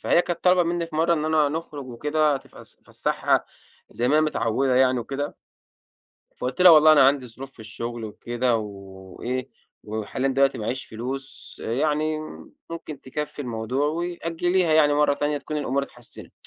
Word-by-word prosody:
فهي 175 Hz, -, +3 dB
كانت 175 Hz, -, -4 dB
طالبة 180 Hz, -1 st, +5 dB
مِنّي 170 Hz, 0 st, -1 dB
في 155 Hz, -, -7 dB
مرّة 165 Hz, +2 st, +3 dB
إننا 155 Hz, -1 st, +2 dB
نخرج 150 Hz, -3 st, -5 dB
وكده 150 Hz, +4 st, +1 dB
تفس -, -, -13 dB
افسحها -, -, 0 dB, 0.5 s
زي 120 Hz, +1 st, -1 dB
ماهي 150 Hz, +3 st, +4 dB
متعودة 130 Hz, -3 st, +1 dB
يعني 130 Hz, -1 st, +4 dB
وكده، 140 Hz, +5 st, -4 dB, 1.0 s
فقلت 125 Hz, +8 st, -2 dB
لها 180 Hz, -, +10 dB
والله 155 Hz, -1 st, +8 dB
أنا 150 Hz, -, +7 dB
عندي 135 Hz, -2 st, +2 dB
ظروف 130 Hz, +3 st, -9 dB
في 115 Hz, -, -16 dB
الشغل 115 Hz, +2 st, -6 dB
وكده 120 Hz, +3 st, -1 dB
و 110 Hz, -, -2 dB, 0.6 s
وإيه 130 Hz, +1 st, -3 dB, 0.4 s
وحاليًا 110 Hz, +5 st, -2 dB
دلوقتي 135 Hz, +1 st, +2 dB
ما 110 Hz, -, -5 dB
معييش 130 Hz, +4 st, -3 dB
فلوس 130 Hz, +4 st, -7 dB
يعني 150 Hz, +5 st, 0 dB, 0.5 s
ممكن 155 Hz, -4 st, -7 dB
تكفي 150 Hz, +2 st, -5 dB
الموضوع 125 Hz, +4 st, -2 dB
و 160 Hz, +3 st, -1 dB
أجليها 175 Hz, 0 st, 0 dB
يعني 150 Hz, -2 st, +5 dB
مرّة 145 Hz, -1 st, +3 dB
تانية 145 Hz, +1 st, -1 dB
تكون 150 Hz, +2 st, -5 dB
الأمور 140 Hz, -1 st, 0 dB
اتحسنت. 120 Hz, -4 st, -11 dB
140 Hz, 160 wpm, -24 LUFS, 125-155 Hz, 1.0 s, لها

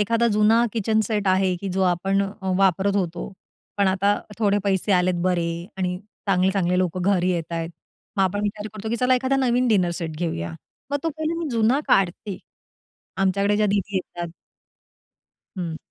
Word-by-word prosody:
एखादा 230 Hz, +3 st, +2 dB
जुना 220 Hz, +3 st, +4 dB
kitchen 220 Hz, -1 st, +1 dB
set 210 Hz, -2 st, -1 dB
आहे, 185 Hz, 0 st, +3 dB
की 195 Hz, +3 st, -5 dB
जो 190 Hz, +1 st, 0 dB
आपण 190 Hz, +2 st, +2 dB, 0.4 s
वापरत 195 Hz, +1 st, +3 dB
होतो; 175 Hz, -1 st, -2 dB, 0.4 s
पण 200 Hz, -1 st, +3 dB
आता 195 Hz, +2 st, +2 dB, 0.2 s
थोडे 205 Hz, -2 st, +3 dB
पैसे 195 Hz, +1 st, +1 dB
आलेत 180 Hz, 0 st, +3 dB
बरे 175 Hz, -2 st, +1 dB, 0.3 s
आणि 180 Hz, -1 st, -1 dB, 0.3 s
चांगले-चांगले 185 Hz, -1 st, +2 dB
लोकं 185 Hz, 0 st, 0 dB
घरी 185 Hz, -1 st, +2 dB
येतायत. 165 Hz, -1 st, -3 dB, 0.5 s
मग 195 Hz, -, +3 dB
आपण 190 Hz, +2 st, +1 dB
विचार 210 Hz, 0 st, -3 dB
करतो, 215 Hz, +1 st, -5 dB
की 235 Hz, -, 0 dB
चला 250 Hz, +2 st, +3 dB
एखादा 260 Hz, +2 st, +1 dB
नवीन 250 Hz, -1 st, +2 dB
डिनर 190 Hz, -6 st, +3 dB
सेट 160 Hz, -2 st, -4 dB
घेऊया, 85 Hz, -, -3 dB, 0.4 s
मग 285 Hz, -, 0 dB
तो 330 Hz, -, 0 dB
पहिले 315 Hz, +2 st, -2 dB
मी 330 Hz, -3 st, -3 dB
जुना 235 Hz, +3 st, +2 dB
काढते. 195 Hz, +1 st, +1 dB, 0.8 s
आमच्याकडे 200 Hz, +2 st, +2 dB
ज्या 210 Hz, 0 st, +3 dB
दीदी 200 Hz, -1 st, 0 dB
येतात 175 Hz, -2 st, -5 dB, 1.3 s
हम्म. 170 Hz, -3 st, -3 dB
195 Hz, 160 wpm, -23 LUFS, 180-215 Hz, 1.3 s, जुना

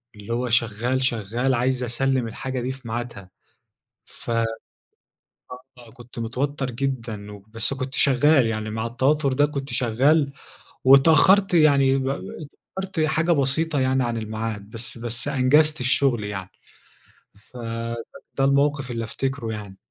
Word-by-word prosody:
اللي 105 Hz, +3 st, -6 dB
هو 125 Hz, +1 st, -1 dB
شغال، 120 Hz, +3 st, +1 dB
شغال، 120 Hz, +2 st, 0 dB
عايز 125 Hz, +1 st, 0 dB
أسلِّم 125 Hz, +1 st, 0 dB
الحاجة 130 Hz, +3 st, -5 dB
دي 130 Hz, +2 st, -2 dB
في 130 Hz, -2 st, -10 dB
ميعادها. 115 Hz, -5 st, -5 dB, 0.8 s
ف -, -, -11 dB, 1.5 s
آه 120 Hz, -2 st, -15 dB
كنت 120 Hz, -1 st, -12 dB
متوتر 130 Hz, +3 st, -2 dB
جدًا، 115 Hz, -5 st, -4 dB
وبس 110 Hz, +5 st, -4 dB
كنت 130 Hz, 0 st, -5 dB
شغال، 140 Hz, 0 st, +4 dB
يعني 110 Hz, -1 st, -3 dB
مع 110 Hz, +1 st, -3 dB
التوتر 135 Hz, +4 st, +1 dB
ده 145 Hz, +2 st, +3 dB
كنت 140 Hz, -1 st, -5 dB
شغال، 140 Hz, +5 st, +3 dB, 0.5 s
واتأخرت 165 Hz, +8 st, +6 dB
يعني 140 Hz, -4 st, +4 dB
و 135 Hz, -, -2 dB, 0.7 s
واتأخرت 190 Hz, -3 st, -3 dB
حاجة 160 Hz, +2 st, +1 dB
بسيطة 145 Hz, +1 st, +1 dB
يعني 130 Hz, -1 st, +1 dB
عن 120 Hz, -1 st, -2 dB
الميعاد، 110 Hz, -1 st, -5 dB
بس 115 Hz, +1 st, -6 dB
بس 120 Hz, +3 st, -3 dB
أنجزت 145 Hz, +2 st, +3 dB
الشغل 125 Hz, -3 st, +2 dB
يعني. 95 Hz, -3 st, -6 dB, 1.0 s
فده 115 Hz, -1 st, -5 dB, 0.5 s
الموقف 140 Hz, -1 st, +1 dB
اللي 115 Hz, -1 st, -3 dB
افتكره 130 Hz, 0 st, -3 dB
يعني. 105 Hz, -3 st, -8 dB
125 Hz, 130 wpm, -23 LUFS, 115-140 Hz, 1.5 s, واتأخرت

